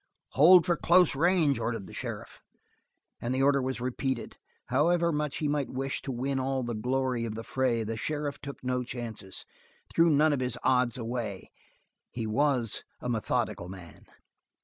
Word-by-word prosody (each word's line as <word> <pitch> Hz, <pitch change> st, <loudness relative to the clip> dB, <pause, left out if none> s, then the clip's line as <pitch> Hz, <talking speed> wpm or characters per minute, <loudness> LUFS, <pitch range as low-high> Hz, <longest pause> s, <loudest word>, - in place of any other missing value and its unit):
"Hold 170 Hz, +5 st, +7 dB
for 175 Hz, -2 st, +2 dB
close 175 Hz, -3 st, +4 dB
range" 160 Hz, -4 st, +3 dB
ordered 115 Hz, -3 st, -3 dB
the -, -, -12 dB
sheriff, -, -, -6 dB, 0.8 s
and 120 Hz, +2 st, -2 dB
the 135 Hz, -, +1 dB
order 140 Hz, 0 st, +4 dB
was 130 Hz, -1 st, -2 dB
repeated. 130 Hz, 0 st, -3 dB, 0.3 s
However 170 Hz, +6 st, +3 dB
much 150 Hz, -2 st, -2 dB
he 150 Hz, -, -1 dB
might 145 Hz, -2 st, -1 dB
wish 135 Hz, +1 st, -3 dB
to 135 Hz, -, -5 dB
win 135 Hz, +2 st, -1 dB
all 130 Hz, 0 st, -1 dB
the 120 Hz, 0 st, -3 dB
glory 125 Hz, +2 st, -1 dB
of 110 Hz, -2 st, -4 dB
the 115 Hz, -, -5 dB
fray, 120 Hz, -2 st, 0 dB
the 110 Hz, +1 st, -4 dB
sheriff 145 Hz, +3 st, -3 dB
took 140 Hz, -3 st, -8 dB
no 125 Hz, 0 st, 0 dB
chances 115 Hz, -6 st, -5 dB, 0.5 s
threw 165 Hz, 0 st, +5 dB
none 150 Hz, 0 st, +4 dB
of 140 Hz, -, 0 dB
his 125 Hz, -1 st, 0 dB
odds 125 Hz, -1 st, +2 dB
away. 115 Hz, -5 st, -4 dB, 0.6 s
He 115 Hz, -2 st, -4 dB
was 125 Hz, -1 st, +1 dB, 0.2 s
a 125 Hz, -, -4 dB
methodical 110 Hz, -5 st, -1 dB
man. 90 Hz, -4 st, -12 dB
130 Hz, 170 wpm, -29 LUFS, 120-145 Hz, 0.8 s, Hold